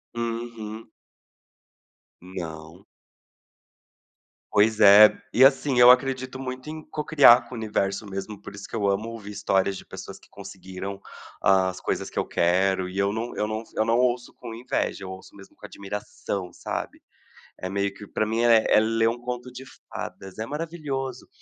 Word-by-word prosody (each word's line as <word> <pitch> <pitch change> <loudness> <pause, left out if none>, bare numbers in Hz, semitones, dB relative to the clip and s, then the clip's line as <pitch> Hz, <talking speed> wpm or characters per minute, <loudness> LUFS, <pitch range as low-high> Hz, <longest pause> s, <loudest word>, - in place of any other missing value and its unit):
Uhum. 115 -2 -5 1.3
Não. 85 -1 -8 1.7
Pois 105 +1 +3
é, 105 0 +9 0.2
e 130 - +5
assim 135 -1 +4
eu 120 +1 +10
acredito 130 0 0
muito 130 +2 -6
em 155 0 -6
cocriar 145 -6 +5
com 125 - -12
o - - -5
universo 105 -2 -2
mesmo 95 +2 -6
por 100 - -10
isso 100 - -9
que - - -8
eu 105 -3 0
amo 100 +3 0
ouvir 105 -3 -8
histórias 100 -1 0
de - - -11
pessoas - - -9
que - - -22
conseguiram 100 0 -8 0.4
as 95 -1 +2
coisas - - -2
que - - -13
eu - - +1
quero, 95 +2 +1
e 95 - -8
eu 100 0 +2
não 115 +3 -4
eu 105 - 0
não 110 +1 -3
eu 110 - +2
não 115 +1 +2
ouço 125 -1 0
com 120 -2 -8
inveja, 120 -4 -2
eu 95 - -7
ouço 95 +1 -12
mesmo 100 -1 -15
com - - -12
admiração 100 -2 -6
sabe? - - -5 0.6
É 95 - -4
meio 100 +1 -1
que 105 +1 -11
pra 110 - -1
mim 110 +2 -1
é 115 -2 +5
é - - +5
ler 115 +1 +2
um 115 +1 -1
conto 125 0 -5
de 130 +2 -10 0.2
fadas, 95 +2 -8
é 110 - -2
maravilhoso, 145 -4 -5
110 Hz, 170 wpm, -25 LUFS, 100-120 Hz, 1.7 s, eu